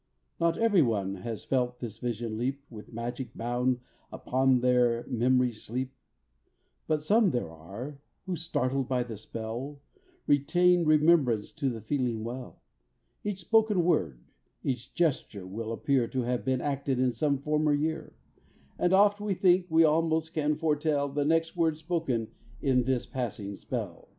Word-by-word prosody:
Not 170 Hz, 0 st, +2 dB
ev'ry 220 Hz, -6 st, +4 dB
one 100 Hz, -7 st, 0 dB
has 110 Hz, +4 st, -5 dB
felt 125 Hz, -2 st, 0 dB
this 115 Hz, -3 st, -6 dB
vision 120 Hz, -2 st, -3 dB
leap 135 Hz, +5 st, -2 dB
With 105 Hz, -2 st, -11 dB
magic 120 Hz, +1 st, -5 dB
bound 125 Hz, +1 st, 0 dB, 0.3 s
upon 130 Hz, -1 st, +2 dB
their 120 Hz, -2 st, +3 dB
mem'ry's 125 Hz, -2 st, +1 dB
sleep, 130 Hz, +3 st, -4 dB, 0.9 s
But 155 Hz, -1 st, 0 dB
some 210 Hz, +5 st, +4 dB
there 120 Hz, -, -2 dB
are, 100 Hz, -, -8 dB, 0.3 s
who, 185 Hz, -2 st, -2 dB
startled 135 Hz, -5 st, -1 dB
by 125 Hz, -2 st, +1 dB
the 120 Hz, -2 st, -7 dB
spell, 115 Hz, +7 st, -6 dB, 0.5 s
Retain 175 Hz, +5 st, +3 dB
remembrance 150 Hz, -8 st, +3 dB
to 140 Hz, -4 st, -1 dB
the 115 Hz, -3 st, -5 dB
feeling 120 Hz, -1 st, -1 dB
well; 125 Hz, +2 st, -7 dB, 0.6 s
Each 205 Hz, -3 st, -3 dB
spoken 215 Hz, -1 st, +3 dB
word, 80 Hz, -, 0 dB, 0.4 s
each 125 Hz, -3 st, -3 dB
gesture 130 Hz, -, 0 dB
will 110 Hz, +4 st, -5 dB
appear 125 Hz, +1 st, +1 dB
To 130 Hz, +1 st, -2 dB
have 125 Hz, 0 st, -1 dB
been 130 Hz, -1 st, 0 dB
acted 140 Hz, -2 st, -1 dB
in 130 Hz, 0 st, +2 dB
some 140 Hz, +5 st, 0 dB
former 150 Hz, +2 st, +1 dB
year, 160 Hz, +2 st, -2 dB, 0.6 s
And 180 Hz, +1 st, +2 dB
oft 205 Hz, +1 st, +5 dB
we 205 Hz, -2 st, -1 dB
think 180 Hz, 0 st, +3 dB
we 165 Hz, +1 st, +5 dB
almost 160 Hz, +1 st, +2 dB
can 150 Hz, -1 st, +1 dB
foretell 150 Hz, -2 st, 0 dB
The 145 Hz, +1 st, -1 dB
next 165 Hz, +2 st, +1 dB
words 165 Hz, -3 st, +1 dB
spoken 155 Hz, -9 st, -1 dB, 0.3 s
in 125 Hz, -1 st, +2 dB
this 130 Hz, -2 st, 0 dB
passing 115 Hz, -6 st, -4 dB
spell. -, -, -6 dB
130 Hz, 150 wpm, -29 LUFS, 120-160 Hz, 0.9 s, oft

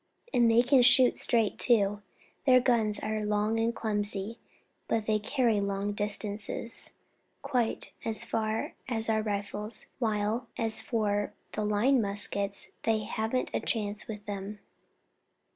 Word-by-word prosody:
And 235 Hz, -1 st, +4 dB
they 230 Hz, +1 st, +5 dB
can 255 Hz, +1 st, +5 dB
shoot 250 Hz, 0 st, +5 dB
straight, 225 Hz, -4 st, +1 dB
too; 205 Hz, -4 st, +2 dB, 0.5 s
their 255 Hz, -1 st, +7 dB
guns 230 Hz, -4 st, +2 dB
are 215 Hz, 0 st, -2 dB
long 210 Hz, +2 st, 0 dB
and 225 Hz, +1 st, +2 dB
clumsy, 210 Hz, 0 st, -2 dB, 0.5 s
but 225 Hz, -2 st, 0 dB
they 215 Hz, -1 st, +1 dB
carry 225 Hz, -1 st, +1 dB
long 200 Hz, +1 st, -1 dB
distances 205 Hz, +2 st, 0 dB, 0.5 s
quite 250 Hz, -5 st, -1 dB
as 220 Hz, -1 st, -1 dB
far 220 Hz, 0 st, -2 dB
as 225 Hz, -3 st, +1 dB
our 220 Hz, 0 st, +2 dB
rifles, 210 Hz, +1 st, -2 dB
while, 220 Hz, +1 st, 0 dB
as 225 Hz, -1 st, -1 dB
for 205 Hz, -3 st, -1 dB, 0.2 s
the 215 Hz, -, -2 dB
line 220 Hz, +5 st, +3 dB
muskets, 200 Hz, -1 st, -1 dB
they 220 Hz, -1 st, +1 dB
haven't 220 Hz, +3 st, -2 dB
a -, -, +1 dB
chance 210 Hz, -2 st, -2 dB
with 210 Hz, -2 st, -7 dB
them." 205 Hz, 0 st, -5 dB
215 Hz, 135 wpm, -29 LUFS, 205-230 Hz, 0.5 s, their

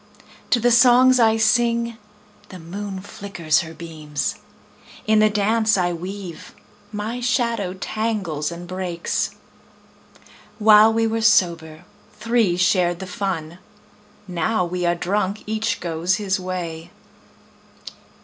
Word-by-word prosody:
To 245 Hz, -, +3 dB
the 240 Hz, +1 st, +2 dB
songs 250 Hz, +1 st, +6 dB
I 225 Hz, -1 st, +4 dB
sing 235 Hz, +1 st, +2 dB, 0.5 s
the 185 Hz, -, -9 dB
moon 190 Hz, +3 st, -7 dB
flickers 195 Hz, -5 st, -1 dB
her 160 Hz, 0 st, -6 dB
beams; 155 Hz, -3 st, -4 dB, 0.7 s
In 215 Hz, 0 st, +3 dB
the 215 Hz, 0 st, +5 dB
dance 215 Hz, +1 st, +2 dB
I 175 Hz, -1 st, 0 dB
weave 180 Hz, 0 st, -8 dB, 0.4 s
my 220 Hz, +3 st, -4 dB
shadow 235 Hz, -6 st, 0 dB
tangles 195 Hz, -8 st, -3 dB
and 175 Hz, +1 st, -8 dB
breaks. 180 Hz, -2 st, -3 dB, 1.2 s
While 215 Hz, 0 st, +6 dB
we 225 Hz, 0 st, +1 dB
were 225 Hz, 0 st, -1 dB
sober, 170 Hz, -7 st, +1 dB, 0.3 s
three 225 Hz, -6 st, +1 dB
shared 180 Hz, -1 st, +2 dB
the 190 Hz, -, -7 dB
fun; 180 Hz, -3 st, -4 dB, 0.7 s
Now 180 Hz, +2 st, 0 dB
we 175 Hz, 0 st, -2 dB
are 175 Hz, -, +2 dB
drunk, 195 Hz, +3 st, -2 dB
each 220 Hz, 0 st, -2 dB
goes 170 Hz, +2 st, -1 dB
his 195 Hz, -3 st, -1 dB
way. 175 Hz, -3 st, -5 dB
195 Hz, 120 wpm, -21 LUFS, 175-220 Hz, 1.2 s, songs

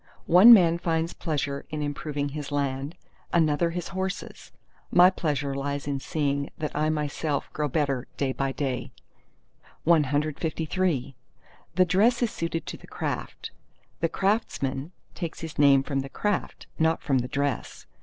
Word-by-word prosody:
—"One 185 Hz, +8 st, +9 dB
man 170 Hz, -6 st, +7 dB
finds 165 Hz, 0 st, -1 dB
pleasure 140 Hz, -3 st, -3 dB
in 155 Hz, -1 st, -3 dB
improving 145 Hz, 0 st, -3 dB
his 145 Hz, 0 st, -6 dB
land, 140 Hz, +2 st, -2 dB, 0.4 s
another 165 Hz, 0 st, +2 dB
his 175 Hz, 0 st, -4 dB
horses. 190 Hz, +1 st, -5 dB, 0.4 s
My 180 Hz, +1 st, +7 dB
pleasure 145 Hz, -6 st, -2 dB
lies 140 Hz, +1 st, -3 dB
in 140 Hz, -1 st, -2 dB
seeing 140 Hz, -1 st, -1 dB
that 155 Hz, -1 st, -4 dB
I 155 Hz, +1 st, +1 dB
myself 150 Hz, -1 st, -2 dB
grow 150 Hz, -1 st, -1 dB
better 140 Hz, -3 st, -1 dB
day 135 Hz, -2 st, 0 dB
by 135 Hz, 0 st, -1 dB
day." 135 Hz, -3 st, -3 dB, 0.9 s
CLIV 155 Hz, 0 st, +1 dB, 0.6 s
The 185 Hz, +1 st, +5 dB
dress 220 Hz, +8 st, +3 dB
is 230 Hz, -, 0 dB
suited 165 Hz, 0 st, -3 dB
to -, -, -6 dB
the -, -, -16 dB
craft; -, -, -5 dB, 0.5 s
the 165 Hz, -, +1 dB
craftsman 165 Hz, -, -1 dB, 0.2 s
takes 165 Hz, -2 st, -5 dB
his 160 Hz, -2 st, -7 dB
name 140 Hz, -2 st, +6 dB
from 135 Hz, -1 st, -2 dB
the 135 Hz, 0 st, -4 dB
craft, 205 Hz, +6 st, -2 dB
not 160 Hz, 0 st, +2 dB
from 135 Hz, -3 st, +2 dB
the 125 Hz, -, -3 dB
dress. 140 Hz, -2 st, -3 dB
150 Hz, 145 wpm, -26 LUFS, 140-170 Hz, 0.9 s, One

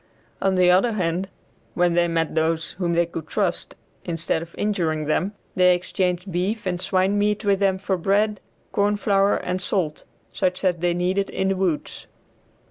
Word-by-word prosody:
On 195 Hz, -1 st, +2 dB
the 180 Hz, -1 st, +5 dB
other 195 Hz, +6 st, +3 dB
hand 185 Hz, -1 st, -1 dB, 0.5 s
when 175 Hz, -1 st, +2 dB
they 175 Hz, 0 st, +3 dB
met 165 Hz, -1 st, -1 dB
those 160 Hz, 0 st, 0 dB
whom 175 Hz, -2 st, 0 dB
they 170 Hz, 0 st, +3 dB
could 165 Hz, -2 st, -7 dB
trust, -, -, -1 dB, 0.3 s
instead 165 Hz, -1 st, -1 dB
of 170 Hz, 0 st, -10 dB
injuring 165 Hz, -7 st, 0 dB
them, 180 Hz, +7 st, 0 dB, 0.2 s
they 180 Hz, -1 st, +5 dB
exchanged 180 Hz, +1 st, -2 dB
beef 195 Hz, +6 st, -1 dB
and 180 Hz, -1 st, -2 dB
swine 190 Hz, +2 st, +1 dB
meat 210 Hz, +1 st, 0 dB
with 200 Hz, -1 st, +3 dB
them 195 Hz, -2 st, +2 dB
for 190 Hz, 0 st, -1 dB
bread, 205 Hz, +3 st, +1 dB, 0.3 s
corn 205 Hz, 0 st, +1 dB
flour, 200 Hz, -1 st, +2 dB
and 180 Hz, +1 st, -3 dB
salt, 180 Hz, -5 st, -1 dB, 0.3 s
such 185 Hz, -1 st, -1 dB
as 180 Hz, -2 st, +2 dB
they 175 Hz, +1 st, 0 dB
needed 185 Hz, +3 st, 0 dB
in 190 Hz, -, -1 dB
the 195 Hz, -, +1 dB
woods. 185 Hz, -5 st, -2 dB
185 Hz, 175 wpm, -23 LUFS, 170-195 Hz, 0.5 s, the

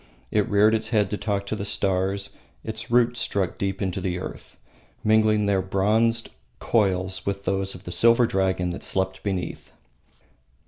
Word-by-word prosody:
It 105 Hz, -2 st, +1 dB
reared 105 Hz, +1 st, +4 dB
its 110 Hz, 0 st, 0 dB
head 105 Hz, -4 st, +1 dB
to -, -, 0 dB
talk 100 Hz, -2 st, -1 dB
to 105 Hz, -, -3 dB
the 100 Hz, -, -4 dB
stars; 95 Hz, 0 st, -1 dB, 0.3 s
its 110 Hz, 0 st, -6 dB
roots 120 Hz, 0 st, +3 dB
struck 100 Hz, -6 st, -1 dB
deep 100 Hz, 0 st, -2 dB
into 95 Hz, 0 st, -2 dB
the 90 Hz, -1 st, -2 dB
earth, -, -, -8 dB, 0.5 s
mingling 110 Hz, -1 st, +3 dB
their 100 Hz, -2 st, +2 dB
bronzed 110 Hz, +5 st, +1 dB, 0.3 s
coils 95 Hz, -4 st, 0 dB
with 100 Hz, 0 st, -3 dB
those 95 Hz, 0 st, -1 dB
of 90 Hz, -, -12 dB
the -, -, -7 dB
silver 115 Hz, +1 st, +5 dB
dragon 95 Hz, -3 st, 0 dB
that 85 Hz, -, -6 dB
slept 95 Hz, 0 st, -1 dB
beneath. 95 Hz, -3 st, -4 dB
100 Hz, 165 wpm, -24 LUFS, 95-110 Hz, 0.5 s, silver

